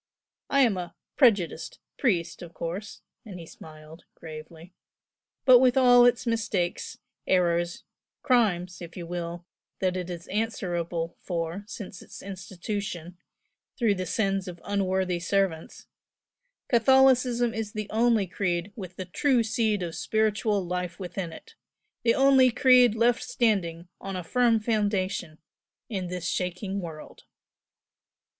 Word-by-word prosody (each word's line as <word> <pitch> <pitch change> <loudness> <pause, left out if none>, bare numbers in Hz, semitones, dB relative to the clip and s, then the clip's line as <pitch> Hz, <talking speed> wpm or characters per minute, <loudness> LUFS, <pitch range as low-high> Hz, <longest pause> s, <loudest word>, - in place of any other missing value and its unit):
I 275 - +4
am 230 -7 +3
a 175 -1 -6 0.2
'prejudiced' 200 - +2 0.2
priest, 185 - 0
of 170 -1 -10
course," 185 +5 -6 0.2
and 195 -5 -9
he 165 - -9
smiled, 155 +1 -13
gravely 160 +2 -11 0.7
"but 255 -2 +8
with 255 0 +4
all 245 -2 +7
its 245 0 +1
mistakes, 220 -6 -2 0.3
errors, 175 -2 +1 0.4
crimes 190 -10 +1
(if 170 0 -9
you 175 - -5
will) 175 0 -5 0.3
that 185 -1 0
it 180 -1 -4
is 170 -1 -6
answerable 175 -6 -2
for 170 +2 -4
since 205 -4 -8
its - - -12
institution, 180 -2 -6 0.6
through 230 -5 +3
the 185 -2 -4
sins 195 -2 0
of 175 -1 -8
unworthy 190 -3 0
servants, 170 -2 -1 0.8
Catholicism 250 -1 +4
is 220 -2 -4
the 215 -1 -4
only 225 -2 +3
creed 180 +1 -2
with 185 -5 -8
the 185 - -5
true 245 +6 +2
seed 220 -3 0
of 170 -2 -4
spiritual 215 -2 0
life 180 -1 -4
within 180 -2 -5
it 455 - -13 0.5
the 230 -1 +3
only 270 -1 +6
creed 250 -1 +5
left 235 +1 +2
standing 200 -9 0
on 195 -1 -6
a 180 - -4
firm 235 +5 +3
foundation 205 -7 -1 0.5
in 190 -5 -3
this 180 -1 -4
shaking 185 +3 -2
world!" 160 -4 -9
195 Hz, 130 wpm, -27 LUFS, 175-225 Hz, 0.8 s, but